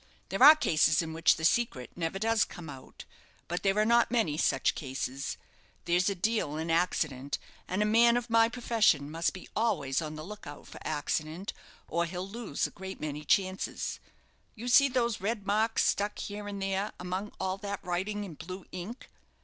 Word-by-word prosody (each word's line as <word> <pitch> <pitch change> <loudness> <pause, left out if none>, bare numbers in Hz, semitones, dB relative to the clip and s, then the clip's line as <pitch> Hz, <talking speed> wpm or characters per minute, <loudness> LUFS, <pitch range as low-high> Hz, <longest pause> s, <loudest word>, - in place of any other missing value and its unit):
There - - -3
are 295 +4 +11
cases 155 - +3
in 160 -1 -6
which 165 +1 +4
the 160 - -3
secret 165 - +1
never 165 +1 -2
does 225 +2 +2
come 165 -5 -8
out; 130 -2 -12 0.4
but 175 +1 -3
there 195 0 +1
are 215 - +4
not 235 +1 +4
many 225 -12 +1
such - - +2
cases. 135 0 -4 0.5
There's 175 +2 +2
a 200 - -2
deal 185 -6 0
in 160 +1 -2
accident; 150 -5 0 0.3
and 190 +3 0
a - - +1
man 235 +2 +5
of 240 -1 -3
my 230 0 +4
profession 220 - +2
must 165 +1 0
be 185 - -10
always 145 - +1
on 155 -1 -5
the 155 - -7
look 210 +1 -9
out 145 0 -9
for - - -11
accident, 155 +4 -2 0.3
or 170 0 0
he'll 180 +2 -5
lose 210 -7 -3
a - - -4
great 190 +1 -8
many 150 0 -4
chances. 185 +4 0 0.6
You 240 +2 -5
see 275 +3 +7
those 240 -5 0
red 205 0 -2
marks 220 +3 +2
stuck 205 +1 0
here 205 0 -6
and 200 -1 -5
there, 195 +2 -1
among 185 +3 -4
all 190 0 -1
that 200 -2 -5
writing 190 +4 -2
in 190 -5 -7
blue 185 +5 -8
ink. 185 +8 -7
190 Hz, 190 wpm, -30 LUFS, 160-215 Hz, 0.6 s, are